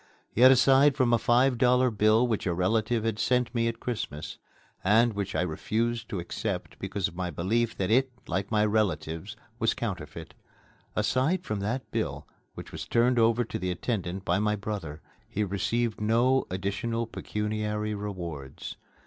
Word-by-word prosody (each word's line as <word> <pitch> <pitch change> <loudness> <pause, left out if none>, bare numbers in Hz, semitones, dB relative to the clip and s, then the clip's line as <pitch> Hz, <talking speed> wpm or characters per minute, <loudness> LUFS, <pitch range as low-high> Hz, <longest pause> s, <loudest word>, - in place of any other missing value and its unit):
Yet 125 +3 +7
aside 135 +2 +5
from 125 -3 +3
a 115 - +4
five 125 +2 +3
dollar 125 0 +4
bill 110 +2 +4
which 110 -4 -1
a 85 - 0
relative 110 +5 +1
had 110 -1 -1
sent 125 -1 +1
me 115 -1 +1
at 115 0 -3
Christmas 105 -11 -5 0.4
and 110 +4 +4
which 100 -1 -3
I - - +2
had 90 - -1
refused 115 +7 -2
to 100 - -3
accept 85 - -4
because 100 -1 -2
of 85 - -11
my 90 0 -2
belief 110 +7 0
that 95 +1 -1
it, 130 +3 +3
like 95 +2 -2
my 105 -1 +3
relatives, 95 -2 -1 0.2
was 115 - +2
counterfeit 85 -7 -5 0.6
aside 160 +8 +1
from 105 - -3
that 115 +6 -3
bill, - - -2 0.3
which - - -9
was - - -6
turned 120 +1 +3
over 115 +1 +4
to - - -5
the 90 +1 -2
attendant 95 -1 -3
by 90 +2 +2
my 105 0 +1
brother, 100 -8 -5 0.3
he 105 - -1
received 105 +4 -1
no 120 +5 +3
additional 100 +5 -2
pecuniary 105 -1 -3
rewards. 85 -10 -6
110 Hz, 165 wpm, -28 LUFS, 95-120 Hz, 0.6 s, Yet